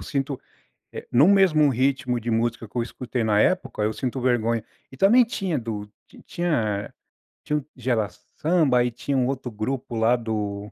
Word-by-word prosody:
sinto, 140 -1 -3 0.5
eh, - - -8
em 120 - +4
um 175 +7 +7
mesmo 170 -7 +5
ritmo 130 -1 0
de 120 +1 -5
música 115 0 -1
que 105 - -32
eu 120 - +1
escutei 125 0 -4
na 105 -1 +2
época, 180 -5 +1
eu 110 - 0
sinto 130 +1 -3
vergonha. 115 -2 +1 0.3
E 130 - -12
também 230 - +6
tinha 195 -8 -2
do 110 -4 -5 0.4
tinha 115 -13 -1 0.5
tinha 150 0 0
o 140 - -12
Gerasamba. 130 - 0
Aí 120 0 +2
tinha 125 +4 -3
um 125 -1 +2
outro 130 -2 -3
grupo 120 +3 -4
lá 110 +2 +4
do 105 -3 -4
125 Hz, 175 wpm, -24 LUFS, 115-140 Hz, 0.5 s, um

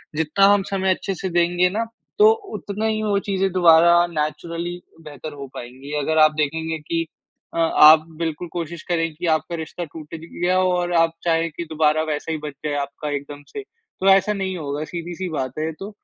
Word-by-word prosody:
जितना 160 +5 +3
हम 200 - +2
समय 190 -1 +2
अच्छे 195 - -4
से 190 +2 -4
देंगे 175 +1 +2
ना, 225 +4 -2 0.3
तो 430 +1 +8 0.2
उतना 210 +2 -4
ही 220 -1 0
वो 205 -2 +1
चीज़ें 195 0 +1
दोबारा 170 -1 +6
नेचुरली 170 +2 -4 0.2
बेहतर 150 -1 -9
हो 140 -1 -8
पाएँगी। 130 +4 -9
अगर 160 +2 0
आप 155 0 +7
देखेंगे 160 +2 -1
कि 165 +2 -2 0.5
अ, - - -5
आप 155 -1 +7
बिल्कुल 165 +1 -3
कोशिश 170 -1 -5
करें 165 -2 0
कि 170 +4 -6
आपका 160 +1 0
रिश्ता 165 +2 -6
टूट 155 +1 -10
भी 165 - -11
गया 180 +1 +2
हो 185 0 +3
और 175 0 -1
आप 165 0 +3
चाहें 165 -1 +1
कि 170 - -5
दोबारा 155 0 +2
वैसा 150 +2 -3
ही 160 - -1
बच 150 -2 -5
जाए 150 - -1
आपका 140 +2 -5
एकदम 145 +1 -7
से, 420 - -7
तो 410 - -4
ऐसा 195 +2 +5
नहीं 190 -2 -3
होगा 145 -1 -4
सीधी-सी 175 +2 -5
बात 130 -3 -4
है 155 - -1
ये 160 - -2
तो। 195 - -6
165 Hz, 200 wpm, -22 LUFS, 155-180 Hz, 0.5 s, तो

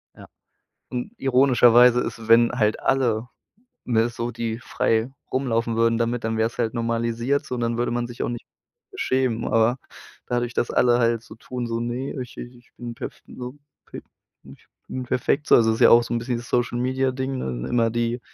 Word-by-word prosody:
Ja, - - -13 0.6
und 125 - -4
ironischerweise 125 -2 +5
isses, 115 -1 -6
wenn 115 +1 +6
halt 110 -3 +1
alle, 125 -4 +1 0.6
ne, 115 -1 +2
so 120 0 -4
die 115 -1 -4
frei 115 0 0 0.2
rumlaufen 115 -3 0
würden 115 0 +2
damit, 115 +1 -1
dann 110 0 -1
wäre 110 - +2
es 115 - -13
halt 115 -2 -1
normalisiert 115 +3 -1
so, 125 - -4
und 120 - -4
dann 115 0 -1
würde 120 0 0
man 120 0 -1
sich 120 0 -8
auch - - -2
nicht 120 -1 -6 0.5
beschämen. 130 -3 -1
Aber, 115 +3 +2 0.5
dadurch, 120 0 -1
dass 120 - 0
alle 120 -1 +3
halt 115 -1 +1
so - - -13
tun, 120 +2 -6
so 115 0 -2
ne, 120 +3 -3
ich 125 - -9
äh, - - -5
ich 120 0 -16
bin 120 -1 -6
perf - - -8
so 125 +2 -8 0.3
pef - - -10 0.4
ich 70 0 -16 0.2
bin 130 - -5
perfekt 130 +4 -1
so - - +7
also, 115 -1 +4
ist 110 - -4
ja - - +7
auch 120 0 +7
so 115 - -4
'n 120 - 0
bisschen 120 0 -2
das 120 - -9
Social-Media-Ding, 130 +2 -1
ne? - - -4
Immer 115 -2 +2
die 120 +1 -1
120 Hz, 195 wpm, -23 LUFS, 115-125 Hz, 0.6 s, so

